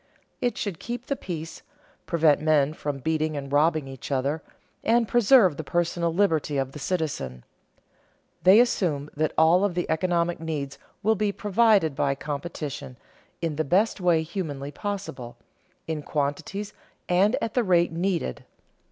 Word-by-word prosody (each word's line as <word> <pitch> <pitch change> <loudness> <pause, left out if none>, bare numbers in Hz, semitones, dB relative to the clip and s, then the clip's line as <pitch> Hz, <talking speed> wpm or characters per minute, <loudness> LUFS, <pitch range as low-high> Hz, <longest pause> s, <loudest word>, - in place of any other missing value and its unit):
It 245 - 0
should 195 -6 -3
keep 240 +1 -5
the 280 - -1
peace, 165 -8 -6 0.5
prevent 160 -4 +3
men 155 -2 +3
from 145 -2 -4
beating 155 +2 -1
and 140 -1 -6
robbing 155 -1 +3
each 135 +1 -8
other, 140 +4 0 0.4
and 230 0 +3
preserve 225 - +5
the 160 - -4
personal 170 +1 0
liberty 160 -5 +1
of 135 -1 -1
the 150 - -9
citizen. 135 - -3 1.0
They 190 +4 +7
assume 165 -12 +1
that 155 +1 0
all 165 +4 +5
of 200 -4 0
the 175 - -1
economic 170 +1 0
needs 150 -4 -4 0.2
will 220 +2 +4
be 210 -1 0
provided 205 -6 +3
by 140 0 +1
competition, 145 -2 -5 0.5
in 160 -3 -1
the 155 - +1
best 190 +7 +1
way 170 -3 +3
humanly 150 -5 -5
possible, 145 - -5 0.5
in 160 -1 -3
quantities 160 +9 -3 0.3
and 195 +6 +3
at 225 - -3
the 245 - +2
rate 175 -4 +3
needed. 170 - -2
160 Hz, 150 wpm, -26 LUFS, 145-195 Hz, 1.0 s, They